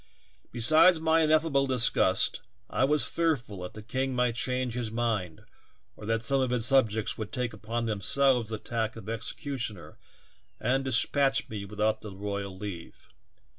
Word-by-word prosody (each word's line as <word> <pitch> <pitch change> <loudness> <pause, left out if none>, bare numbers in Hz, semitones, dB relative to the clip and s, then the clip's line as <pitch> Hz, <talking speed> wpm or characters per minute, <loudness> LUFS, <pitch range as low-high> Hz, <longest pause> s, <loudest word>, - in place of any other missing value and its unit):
Besides 155 +9 +5
my 160 0 +3
ineffable 155 -3 +3
disgust 125 -3 +1 0.3
I - - +1
was 150 -2 +2
fearful 130 - -1
that 90 - -7
the 110 - -9
king 130 +3 -2
might 125 -1 +2
change 125 +1 -1
his 120 -3 -3
mind 110 -8 -2 0.5
or 105 - -10
that 115 0 0
some 135 +2 +2
of 130 - +1
his 120 -2 +1
subjects 115 -6 +2
would 110 -1 -5
take 125 0 -2
upon 115 +3 -3
themselves 120 +3 +1
the 110 - -3
task 110 0 -3
of 115 -3 -10
executioner 115 - -5 0.6
and 130 +3 +1
despatch 135 +2 +1
me 105 -2 -5
without 105 +2 -1
the 105 - -7
royal 100 -1 -4
leave. 95 -4 -8
115 Hz, 155 wpm, -28 LUFS, 110-135 Hz, 0.6 s, Besides